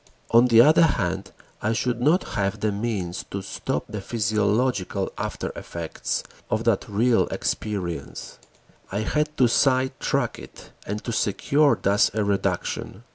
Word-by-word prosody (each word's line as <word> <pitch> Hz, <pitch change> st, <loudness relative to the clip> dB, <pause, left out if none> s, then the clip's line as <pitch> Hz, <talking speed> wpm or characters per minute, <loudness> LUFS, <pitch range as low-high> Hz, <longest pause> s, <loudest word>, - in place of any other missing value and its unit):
On 120 Hz, +2 st, +6 dB
the 115 Hz, -1 st, +7 dB
other 155 Hz, +6 st, +6 dB
hand 95 Hz, -, +1 dB, 0.3 s
I 110 Hz, +2 st, +1 dB
should 120 Hz, +1 st, -1 dB
not 160 Hz, +8 st, +2 dB
have 100 Hz, -1 st, -1 dB
the 110 Hz, -, +1 dB
means 100 Hz, -4 st, -3 dB
to 100 Hz, -1 st, -5 dB
stop -, -, -3 dB
the 105 Hz, -, -5 dB
physiological 110 Hz, 0 st, 0 dB
after -, -, -4 dB
effects 85 Hz, -2 st, -4 dB, 0.3 s
of 110 Hz, +1 st, 0 dB
that 115 Hz, -4 st, +1 dB
real 115 Hz, +3 st, +2 dB
experience: 90 Hz, -8 st, -4 dB, 0.5 s
I 100 Hz, +2 st, -1 dB
had 150 Hz, +6 st, -1 dB
to 125 Hz, -, +5 dB
sidetrack 130 Hz, +2 st, +1 dB
it -, -, -13 dB, 0.2 s
and 105 Hz, +2 st, -4 dB
to 120 Hz, -, -3 dB
secure 140 Hz, +7 st, +2 dB
thus 100 Hz, +1 st, +3 dB
a 110 Hz, -, +1 dB
reduction. 100 Hz, +1 st, -2 dB
110 Hz, 140 wpm, -24 LUFS, 100-125 Hz, 0.5 s, the